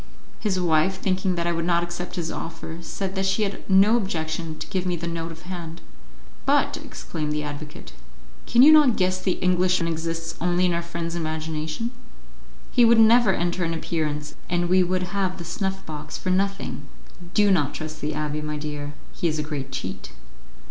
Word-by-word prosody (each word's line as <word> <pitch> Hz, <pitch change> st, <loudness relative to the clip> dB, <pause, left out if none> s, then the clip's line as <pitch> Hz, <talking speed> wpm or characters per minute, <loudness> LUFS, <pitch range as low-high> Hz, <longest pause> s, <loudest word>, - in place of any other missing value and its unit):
His 190 Hz, -3 st, 0 dB
wife, 175 Hz, +2 st, +2 dB
thinking 185 Hz, -1 st, 0 dB
that 170 Hz, -1 st, -1 dB
I 170 Hz, -, +1 dB
would 165 Hz, 0 st, -1 dB
not 170 Hz, 0 st, +2 dB
accept 175 Hz, +1 st, -5 dB
his 170 Hz, -3 st, -2 dB
offer, 165 Hz, 0 st, -6 dB
said 190 Hz, +2 st, -4 dB
that 190 Hz, 0 st, -1 dB
she 195 Hz, +3 st, +2 dB
had 200 Hz, -1 st, -3 dB
no 195 Hz, +4 st, +6 dB
objection 160 Hz, -5 st, -3 dB
to -, -, -5 dB
give 185 Hz, -2 st, -2 dB
me 180 Hz, -1 st, 0 dB
the 170 Hz, -, -5 dB
note 165 Hz, 0 st, -3 dB
of 165 Hz, +1 st, -11 dB
hand. 170 Hz, -2 st, -6 dB, 0.6 s
"But," -, -, +3 dB
exclaimed 150 Hz, -2 st, -5 dB
the 150 Hz, 0 st, -1 dB
advocate, 150 Hz, +1 st, -7 dB, 0.5 s
"can 240 Hz, +1 st, +6 dB
you 300 Hz, -, +10 dB
not 295 Hz, -7 st, +6 dB
guess 185 Hz, 0 st, +1 dB
the 185 Hz, -1 st, +1 dB
Englishman 180 Hz, -1 st, +2 dB
exists 165 Hz, 0 st, -3 dB
only 180 Hz, +1 st, +2 dB
in 180 Hz, -, +2 dB
our 170 Hz, -, 0 dB
friend's 170 Hz, 0 st, -4 dB
imagination? 160 Hz, +5 st, -3 dB, 0.8 s
He 245 Hz, -, +5 dB
would 230 Hz, 0 st, +6 dB
never 225 Hz, -1 st, +6 dB
enter 175 Hz, 0 st, 0 dB
an 165 Hz, 0 st, -1 dB
appearance, 150 Hz, -2 st, -2 dB, 0.2 s
and 175 Hz, 0 st, +1 dB
we 185 Hz, +1 st, +5 dB
would 185 Hz, 0 st, +1 dB
have 190 Hz, -2 st, 0 dB
the 170 Hz, -, -7 dB
snuff 190 Hz, +3 st, -3 dB
box 150 Hz, -2 st, -6 dB
for 185 Hz, -, -2 dB
nothing. 195 Hz, +1 st, -1 dB, 0.5 s
Do 205 Hz, -1 st, +5 dB
not 150 Hz, -7 st, +2 dB
trust 155 Hz, 0 st, -6 dB
the 150 Hz, +1 st, -1 dB
abbé, 150 Hz, 0 st, -2 dB
my 150 Hz, 0 st, -3 dB
dear, 145 Hz, -1 st, -5 dB, 0.2 s
he 175 Hz, -, -1 dB
is 155 Hz, -1 st, 0 dB
a 150 Hz, -, -1 dB
great 140 Hz, -3 st, -5 dB
cheat." 95 Hz, -, -5 dB
170 Hz, 190 wpm, -24 LUFS, 155-185 Hz, 0.8 s, you